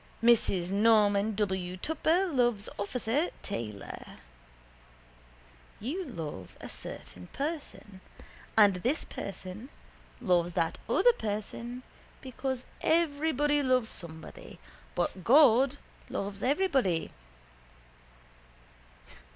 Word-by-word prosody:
Mrs 195 -6 +4
Norman 210 0 +4
W. 190 -3 -1
Tupper 320 - +1
loves 240 - +1
officer 245 - 0
Taylor. 105 - -5 1.6
You 325 - -3
love 155 - -7
a - - -8
certain 90 0 -8
person. 280 - -5 0.6
And 205 -4 +6
this 255 - -1
person 195 +5 -7 0.5
loves 175 -6 +2
that 165 -2 0
other 485 - +5
person 230 - -4 0.4
because 260 0 -4 0.2
everybody 295 -2 +2
loves 255 -4 +2
somebody 160 -2 -9 0.4
but 185 - -1
God 270 - +6 0.3
loves 200 0 -4
everybody. 265 - +1
225 Hz, 85 wpm, -30 LUFS, 190-275 Hz, 1.6 s, And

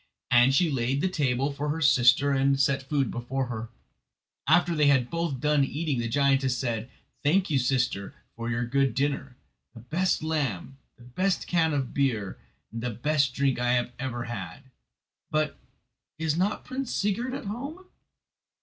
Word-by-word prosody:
And 120 +2 +6
she 165 +2 +3
laid 130 +1 0
the 185 - +1
table 140 -6 0
for 145 +1 -3
her 155 +2 -1
sister 135 -1 +5
and 135 0 +2
set 135 0 +2
food 135 -1 -1
before 130 +3 -2
her. 110 -1 -5 0.8
After 170 +3 +4
they 150 -2 +3
had 130 -4 +3
both 165 -5 -2
done 150 0 +2
eating 145 -1 -2
the 115 - -1
giantess 135 0 +2
said: 120 -2 -3 0.3
"Thank 180 +5 +2
you, 140 - +3
sister, 125 -6 -1 0.2
for 115 0 -4
your 120 +1 -1
good 135 0 +1
dinner—the 135 -3 -4
best 160 +10 0
lamb, 135 - -2 0.2
the 120 - -17
best 185 +11 -1
can 165 -2 +2
of 135 -4 -2
beer 115 -9 -1 0.3
and 115 - -5
the 125 - -2
best 140 +3 0
drink 135 -3 +1
I 120 0 +2
have 125 0 0
ever 120 -2 -3
had; 120 - -7 0.6
but—is 155 0 -4
not 195 +5 -1
Prince 265 -1 -4
Sigurd 230 +6 -1
at 275 - -6
home?" 280 - -6
135 Hz, 160 wpm, -27 LUFS, 125-155 Hz, 0.8 s, And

